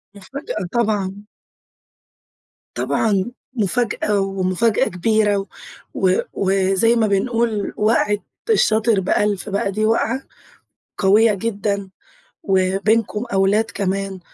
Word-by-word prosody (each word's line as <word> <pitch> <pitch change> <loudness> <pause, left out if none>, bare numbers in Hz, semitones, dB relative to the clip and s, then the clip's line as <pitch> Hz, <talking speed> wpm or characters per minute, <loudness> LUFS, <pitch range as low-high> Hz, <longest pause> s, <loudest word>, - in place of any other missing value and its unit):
مُفاجأة 275 - -6
طبعًا. 205 -4 -1 1.5
طبعًا، 210 +1 0 0.2
مفاجأة 210 -2 0
ومفاجأة 195 +2 +1
كبيرة 205 +1 +1 0.5
و 185 -1 +2 0.2
وزي 195 +4 +2
ما 225 -2 +2
بنقول 220 +1 0
وقعة 210 -1 +2 0.3
الشاطر 220 - +3
بأَلْف، 205 +2 0
بقى 200 0 -1
دي 215 +2 0
وقعة 230 +3 +1 0.8
قويّة 210 +2 +4
جدًا، 200 -2 -2 0.5
وبينكم 200 +4 +1
أولاد 195 +3 +3
كمان. 195 -1 -2
205 Hz, 90 wpm, -20 LUFS, 195-225 Hz, 1.5 s, قويّة